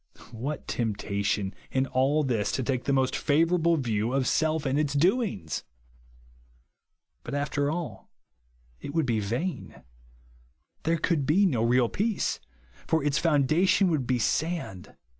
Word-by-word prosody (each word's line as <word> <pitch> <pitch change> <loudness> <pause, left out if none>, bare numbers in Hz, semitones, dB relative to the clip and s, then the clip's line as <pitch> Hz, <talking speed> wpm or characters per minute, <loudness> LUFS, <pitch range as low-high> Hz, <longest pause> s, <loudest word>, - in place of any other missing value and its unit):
What 130 +6 -5
temp 110 -4 -1
tation 100 -1 -1 0.2
in 130 0 +1
all 135 +4 +1
this 115 -7 0
to 130 - -1
take 125 0 -2
the - - +1
most 130 -1 +1
flivour 165 +4 +2
able 165 0 +3
view 115 -3 -1
of 135 -1 +1
self 160 +2 +1
and 135 +2 +1
its 145 -2 0
doings! 170 - 0 1.6
But, - - -5
after 145 0 0
all, 165 +1 -5 0.7
it 140 - -7
would 160 -3 +2
be 115 -3 0
vain. 120 - -4 1.0
There 165 +1 +2
could 155 -3 0
be 185 +7 +4
no 130 -12 +1
real 120 +1 +3
peace; 210 - -1 0.5
for 160 -2 +1
its 145 -1 +1
foundation 165 +5 +3
would 140 -6 -1
be 130 - +2
Kand. 150 - -2
140 Hz, 145 wpm, -27 LUFS, 120-160 Hz, 1.6 s, be